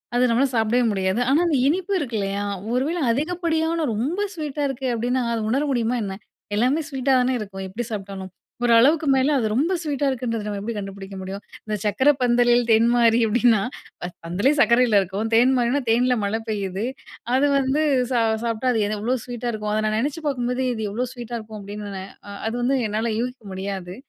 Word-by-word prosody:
அது 245 - +3
நம்மளால 255 +4 +2
சாப்பிடவே 225 +2 +2
முடியாது. 190 +2 0
ஆனா, 290 +4 +4
அந்த 295 -5 +2
இனிப்பு 375 +4 -1
இருக்கு 240 -7 -3
இல்லையா? 200 +1 -2 0.3
ஒருவேள 290 +8 0
அதிகப்படியான, 325 +2 0
ரொம்ப 280 - -2 0.2
ஸ்வீட்டா 295 -2 -3
இருக்கு 265 0 -3
அப்படினா, 245 +2 0
அத 230 - -1
உணர 275 +4 +1
முடியுமா 240 0 0
என்ன? 195 -1 -4 0.4
எல்லாமே 255 +8 +2
ஸ்வீட்டா 270 -1 -1
தானே 250 +1 +1
இருக்கும், 195 -2 -6
எப்படி 220 +5 -5
சாப்பிட்டாலும்? 195 -2 -6 0.3
ஓரளவு 235 +2 +6
அதுக்கு 315 -1 -1
மேலே 265 +3 +2
அது 230 - 0
ரொம்ப 305 +10 +1
ஸ்வீட்டா 285 -3 -1
இருக்குன்றத 230 -4 -2
நம்ம 205 -1 -3
எப்படி 225 +3 -4
கண்டுபிடிக்க 195 -1 -7
முடியும்? 195 +2 -6 0.2
இந்த 215 -1 -2
"சர்க்கரை 260 +8 +4
பந்தலில் 240 0 +4
தேன் 225 +1 +5
மாறி" 235 -1 +4
அப்படின்னா, 230 -1 +3 0.6
பந்தலே 200 - +2
சர்க்கரையில 235 -5 +5
இருக்கும். 195 +4 -3
தேன் 245 +3 +5
மாறினா, 245 +4 +2
தேன்ல 250 +2 +3
மழை 215 +3 -1
பெய்யுது. 200 0 -2 0.5
அது 285 +2 +3
வந்து 275 +3 +1 0.3
சா 240 - +2 0.2
சாப்பிட்டா 235 +2 0
அது 225 -3 +1 0.2
எவ்வளோ 245 +5 0
ஸ்வீட்டா 245 -1 -4
இருக்கும்? 210 -1 -3
அத 215 - +1
நான் 215 0 0
நினச்சு 290 +5 -2
பார்க்கும்போது, 250 -1 -1
இது 220 -1 -4
எவ்வளோ 245 +4 -2
ஸ்வீட்டா 240 -1 -6
இருக்கும் 215 -1 -9
அப்படின்னு, 200 -1 -6 0.4
அது 225 - -2
வந்து 265 +2 +2
என்னால 220 +2 -1
யூகிக்க 250 -1 -4
முடியாது. 190 -1 -5
240 Hz, 180 wpm, -23 LUFS, 210-265 Hz, 0.6 s, ஓரளவு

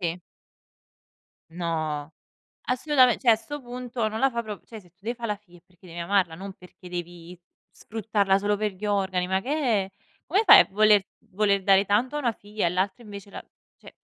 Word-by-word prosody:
Sì. 170 -1 -2 1.3
No, 160 -3 -3 0.5
assolutamen 255 -2 +3
cioè 245 - +5
a 225 - +6
'sto 260 +7 -8
punto 245 -2 -4
non 215 +1 -5
la 270 - +3
fa 235 - -1
prop 210 -3 -8
cioè 220 -2 -10
se 180 - -21
tu 180 - -51
devi 235 +2 -2
fà 235 -1 -5
la 210 -2 -2
figlia 185 -4 -20
è - - -27
perché 180 0 -21
devi 170 0 -8
amarla, 180 -1 +1
non 195 +4 -8
perché 180 0 -15
devi 175 0 -8 0.3
sfruttarla 205 -3 0
solo 205 +1 0
per 210 0 -2
gli 190 +3 -10
organi, 190 -3 0
ma 190 0 +1
che 255 - -6 0.4
è! - - -17 0.4
Come 390 +7 +2
fai - - +10
a - - +3
voler 210 -1 +4 0.2
voler 200 0 +1
dare 195 0 +4
tanto 225 +8 0
a - - 0
una 245 -5 0
figlia 205 -2 -4
e 170 - +1
l'altra 190 +5 -2
invece 200 -1 -10
la - - -9 0.3
cioè! - - -16
200 Hz, 205 wpm, -25 LUFS, 180-225 Hz, 1.3 s, fai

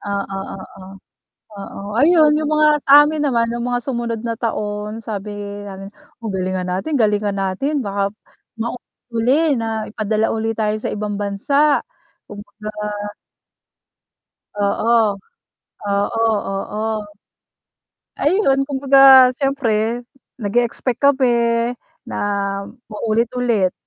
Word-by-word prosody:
Oo, 200 -1 -4 0.2
oo. 190 0 -12 0.8
Oo, 195 - -8 0.2
ayun 305 +1 +5
yung 305 -1 -1
mga 305 0 +4 0.2
sa - - +2
amin 300 0 -1
naman 235 -4 +1
yung 235 +1 -3
mga 245 0 -1
sumunod 235 -3 -3
na 230 -1 -3
taon 210 -1 -3
sabi 210 -1 -5 0.3
namin, 195 0 -8 0.3
o, 225 - -4
galingan 185 -1 -2
natin 190 +13 -2
galingan 210 -5 +1
natin 270 +10 -1
baka 200 -2 -2 0.5
maulit 235 +2 -4 0.2
uli 265 +7 +2
na 225 -1 -3
ipadala 215 0 0
uli 225 0 -1
tayo 215 -1 0
sa 215 - -4
ibang 210 -1 -3
bansa. 275 +9 +2 0.5
Kung 205 0 -9
baga 210 +1 -9 1.9
Oo, 225 +3 +2 0.9
oo, 220 +3 +1 0.2
oo. 210 +2 -4 1.4
Ayun, 300 -4 +3
kung 280 -2 -2
baga 270 -2 +8
syempre 245 -4 -1 0.3
nag-e-expect 240 +2 -1
kami 240 -4 +2 0.3
na - - -6 0.7
maulit 220 +2 0
ulit. 230 -7 +1
225 Hz, 115 wpm, -19 LUFS, 205-260 Hz, 1.9 s, baga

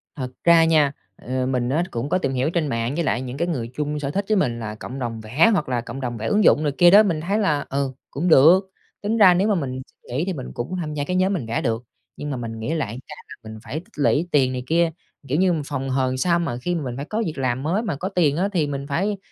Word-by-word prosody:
Thật 130 -3 -4
ra 170 -1 +6
nha, 155 -4 +3 0.2
ờ, 130 +1 -3
mình 125 -1 -1
á 160 +6 +1
cũng 120 +5 -3
có - - +2
tìm 135 -7 -2
hiểu 130 +4 0
trên 165 -3 -1
mạng 115 +2 -2
với 170 - 0
lại 125 -4 0
những 130 +1 -6
cái 170 +2 0
người 120 -9 -3
chung 150 +1 -2
sở 140 -1 -3
thích 200 +4 -2
với 215 - +3
mình, 120 -9 0
là 105 -1 -5
cộng 130 +5 -8
đồng 115 -3 -4
vẽ 135 - +3
hoặc 155 -8 0
là 120 -2 0
cộng 130 +3 -7
đồng 120 -2 -3
vẽ 110 - -4
ứng 210 0 +2
dụng 155 - +5
này 145 - +1
kia 175 0 +7
đó, 210 +2 +8
mình 165 -6 -1
thấy 200 +6 0
là, 150 -8 +1
ừ, 135 -1 -1 0.2
cũng 165 +6 -2
được. 175 +6 +6 0.3
Tính 215 +3 -1
ra 190 -4 +7
nếu 190 +4 +2
mà 210 - +2
mình 130 -5 -3
xin - - -32 0.2
nghỉ 160 - +1
thì 190 - -2
mình 130 -5 -7
cũng 125 +10 -4
tham 150 -2 -4
gia 145 -1 -2
cái 180 +5 -2
nhóm 190 +2 +2
mình 155 -11 -2
vẽ 115 +1 -2
được, 115 -1 -1 0.3
nhưng 145 - -5
mà 130 - -3
mình 115 -1 -6
nghĩ 130 +9 -2
lại 125 -6 -3
cái - - -9
là - - -10
mình 110 0 -9
phải - - -9
tích 180 - -19
lũy 145 +3 +2
tiền 130 -3 +3
này 125 -1 -4
kia. 165 0 +2 0.4
Kiểu 145 - 0
như, 185 -1 +3
mình 155 - -1
phòng 135 -2 -4
hờ 130 0 +1
làm 130 0 -2
sao 170 +4 +2
mà 165 -8 -2
khi 175 +3 -1
mà 160 - -2
mình 125 -2 -4
phải 140 - -4
có 220 +5 -2
việc 155 -5 -4
làm 130 0 -1
mới 185 +8 0
mà 215 -10 -2
có 185 +7 -4
tiền 160 -6 +2
á, 195 +3 +1
thì 160 -5 +1
mình 140 -1 -4
phải, 195 +8 0
145 Hz, 300 wpm, -22 LUFS, 130-175 Hz, 0.4 s, đó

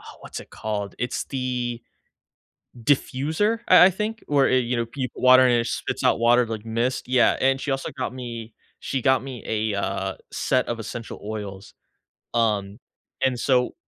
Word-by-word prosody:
uh, - - -18 0.2
what's - - -7
it - - -14
called? 105 -3 -4
It's 125 +2 -2
the 125 -3 -3 1.0
diffuser, 155 - +1
I 180 - +9
I - - +5
think? 215 +4 -3
W 145 - -3
where, 135 -1 +5
you 125 -1 +2
know, 115 0 -1
peep 130 +2 -4
water 130 0 +7
and 125 - +4
it 115 - -3
spits - - -3
out - - +4
water 120 +1 +4
like 110 -1 -5
mist, 115 +4 -1
yeah, 130 -1 +4
and 135 0 +2
she 145 - -3
also 135 0 -3
got 130 - -3
me 115 -3 -7 0.3
she 135 - -2
got 130 +1 +3
me 130 -3 -7
a, 110 -1 -1
uh, 95 -1 -2 0.2
set 130 -1 0
of 120 -1 -2
essential 115 +1 -7
oils, 100 -2 -7 0.6
um, 105 -3 0 0.5
and 130 -2 +1
so 125 0 +2
125 Hz, 175 wpm, -24 LUFS, 110-130 Hz, 1.0 s, I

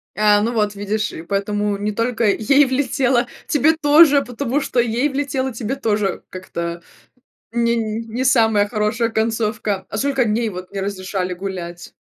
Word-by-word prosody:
А, 210 -1 +4
ну 235 +3 -1
вот 210 -2 0
видишь, 210 +2 -2
и 160 - -8
поэтому 200 +2 -1
не 210 +1 -2
только 230 +2 -1
ей 275 +8 +4
влетело, 260 -2 +1 0.2
тебе 305 +2 +3
тоже, 295 -1 +6
потому 250 +3 -2
что 255 -3 -1
"ей 240 +5 +1
влетело, 270 -2 -2
тебе 230 +3 -3
тоже"- 210 -7 -1
как-то 170 -2 -5 0.7
не 235 0 +1
не 225 +2 -3
самая 220 -5 +3
хорошая 215 +1 0
концовка. 220 -3 -1
А 215 - -4
сколько 270 0 +1
дней 220 +1 0
вот 180 -1 -8
не 195 - -4
разрешали 185 -2 -3
гулять? 175 -2 -7
220 Hz, 155 wpm, -20 LUFS, 205-250 Hz, 0.7 s, тоже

